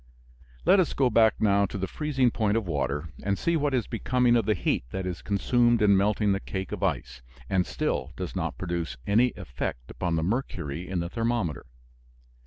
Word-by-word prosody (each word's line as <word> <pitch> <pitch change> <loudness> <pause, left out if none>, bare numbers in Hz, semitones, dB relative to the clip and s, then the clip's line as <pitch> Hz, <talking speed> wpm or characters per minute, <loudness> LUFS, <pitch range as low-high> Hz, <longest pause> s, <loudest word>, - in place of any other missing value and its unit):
Let 195 - +6
us 180 - +2
go 130 -3 +2
back 110 0 +5
now 100 -2 +3
to 100 - -6
the 95 - -1
freezing 135 -3 +1
point 110 -1 +1
of 115 - -1
water 80 -2 -2
and 100 0 0
see 170 - +1
what 145 -3 +1
is 125 - 0
becoming 125 +1 +2
of 115 -3 +1
the 110 - +3
heat - - 0
that 95 +5 -4
is 90 -2 -4
consumed 120 +3 +2
in 100 -1 +5
melting 105 +1 +2
the 95 - +1
cake 95 -1 -5
of - - -4
ice, 60 +1 -2 0.3
and 90 -3 +2
still - - -2
does - - -5
not - - -2
produce 85 -7 -3
any 115 +5 +4
effect - - -5
upon 90 -2 -2
the 80 - 0
mercury 90 - -3
in 90 -2 -1
the 85 - -4
thermometer. 115 - -2
100 Hz, 195 wpm, -27 LUFS, 90-120 Hz, 0.3 s, Let